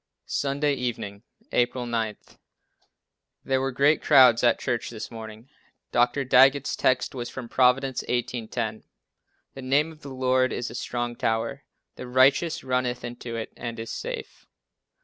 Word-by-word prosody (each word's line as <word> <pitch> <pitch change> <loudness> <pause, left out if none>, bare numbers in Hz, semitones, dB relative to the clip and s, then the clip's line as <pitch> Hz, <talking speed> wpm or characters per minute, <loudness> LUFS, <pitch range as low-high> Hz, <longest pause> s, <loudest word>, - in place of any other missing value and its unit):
Sunday 145 +1 0
Evening, 115 -6 -4 0.3
April 125 0 +1
9. 115 -3 -2 1.3
There 130 0 +1
were 135 0 -1
great 140 +4 +3
crowds 130 -5 +6
at 120 -1 +4
church 120 -2 -2
this 115 0 -7
morning. 110 +1 -9 0.4
Dr. 120 +3 +2
Daggett's 135 +2 +4
text 130 0 +1
was 120 -2 -5
from 130 -3 -7
Prov. 125 +1 +4
18: 125 -3 -3
10: 110 -2 -4 0.7
"The 135 - -9
name 140 +5 +1
of 155 -1 -16
the 140 - -9
Lord 130 0 +1
is 120 - -4
a - - -9
strong 120 0 -3
tower; 115 +5 -2 0.3
the 125 - -7
righteous 135 +6 +3
runneth 125 -1 -1
into 120 -1 -6
it, 115 -1 -5
and 115 -1 -6
is 115 - -6
safe." - - -7
125 Hz, 150 wpm, -26 LUFS, 120-135 Hz, 1.3 s, crowds